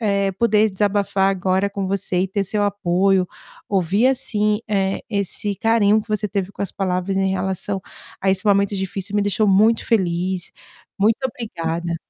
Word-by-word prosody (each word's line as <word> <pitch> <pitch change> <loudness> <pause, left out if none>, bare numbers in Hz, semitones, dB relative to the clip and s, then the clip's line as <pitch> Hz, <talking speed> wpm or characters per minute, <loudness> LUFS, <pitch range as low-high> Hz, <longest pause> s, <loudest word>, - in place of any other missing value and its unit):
eh, 200 -3 +1
poder 215 +1 +2
desabafar 200 0 +1
agora 190 +1 +1
com 200 -1 -4
você 190 -2 0
e 190 - 0
ter 200 +1 -1
seu 205 +2 -1
apoio, 195 -1 +2 0.4
ouvir, 195 +4 +2
assim, 215 -5 +1
eh, 195 -2 0
esse 200 0 -2
carinho 220 -2 +3
que 215 - -13
você 210 -1 -1
teve 195 0 -3
com - - -5
as 195 - -2
palavras 185 0 -2
em 195 0 +1
relação 190 +1 -2 0.4
a 190 - +2
esse 195 +3 +1
momento 200 0 +3
difícil 195 +1 -4
me 205 - +2
deixou 205 +1 +1
muito 215 +4 +4
feliz. 185 -4 0 0.4
Muito 215 +3 +2
obrigada. 170 -8 -4
200 Hz, 165 wpm, -21 LUFS, 190-210 Hz, 0.4 s, muito